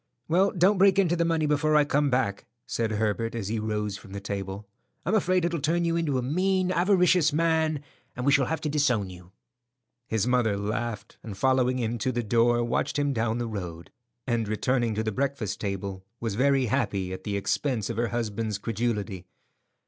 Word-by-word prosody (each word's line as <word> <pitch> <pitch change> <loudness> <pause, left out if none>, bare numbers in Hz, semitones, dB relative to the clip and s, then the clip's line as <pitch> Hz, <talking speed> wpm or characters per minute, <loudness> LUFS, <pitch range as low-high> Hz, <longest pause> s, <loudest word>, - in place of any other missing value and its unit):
"Well, 185 +5 +3
don't 190 +2 +3
break 195 0 +5
into 175 -3 +3
the 170 - +1
money 165 -2 +1
before 150 +1 +2
I 150 -1 +5
come 145 0 +2
back," 125 -6 -1 0.2
said 115 -2 -1
Herbert 110 +2 -1
as 105 -4 -3
he 110 0 -1
rose 105 -2 -2
from 100 -1 -13
the 100 - -4
table. 100 0 -5 0.4
"I'm 185 - 0
afraid 185 -4 +2
it'll 170 -3 -1
turn 170 +4 +1
you 165 0 +1
into 160 -5 0
a 125 - -1
mean, 185 +6 +1
avaricious 180 -3 +4
man, 160 -1 +1 0.3
and 125 - -4
we 140 - +4
shall 140 -2 +3
have 160 -1 -2
to 150 - -2
disown 125 -10 +1
you." 90 0 -13 0.8
His 110 -3 0
mother 120 -5 +2
laughed, 105 +1 -4
and 105 -4 -8
following 130 +1 +2
him 120 -1 -2
to 130 - 0
the 120 -1 -2
door, 120 +2 +3
watched 120 +3 -1
him 145 -1 +1
down 110 -1 0
the 120 - -2
road; 90 -6 -6 0.3
and 120 -4 0
returning 115 +1 0
to 110 - -1
the 110 - -1
breakfast 130 -4 -2
table, 100 -1 -4 0.2
was 115 -3 -2
very 135 +3 +3
happy 95 -4 -1
at 95 - -7
the 100 -1 -2
expense 115 +2 -1
of 115 - -6
her 120 0 +1
husband's 110 -2 -2
credulity. 105 -4 -3
120 Hz, 195 wpm, -27 LUFS, 105-150 Hz, 0.8 s, break